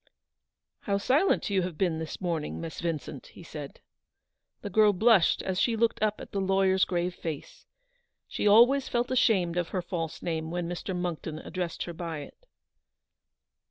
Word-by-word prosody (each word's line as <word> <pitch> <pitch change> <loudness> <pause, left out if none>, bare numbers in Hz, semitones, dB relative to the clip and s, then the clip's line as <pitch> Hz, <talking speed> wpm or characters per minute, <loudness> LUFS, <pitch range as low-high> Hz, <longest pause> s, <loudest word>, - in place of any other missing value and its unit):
" - - -60
How 200 -1 +2
silent 260 - +2
you 195 -1 +2
have 175 -3 -4
been 170 -3 0
this 160 -1 -5
morning, 170 -5 -2
Miss 165 -1 -6
Vincent," 155 -4 -4
he - - -14
said. 150 -3 -9 0.8
The - - -4
girl 215 -2 +5
blushed 210 -2 +4
as 190 -1 -1
she 235 - +2
looked 225 -1 +1
up 215 -1 +1
at - - -10
the 200 - -1
lawyer's 190 0 +3
grave 175 0 -1
face. 160 -4 -7 0.6
She - - -1
always 245 +6 +6
felt 240 +1 0
ashamed 190 -9 +2
of 175 -1 0
her 185 - -2
false 165 -2 -4
name 160 -2 -2
when 175 0 -3
Mr. 175 +1 -4
Monckton 170 -3 -4
addressed 175 +1 -4
her 170 - -6
by 165 -2 -5
it. - - -14
180 Hz, 170 wpm, -28 LUFS, 165-205 Hz, 0.8 s, always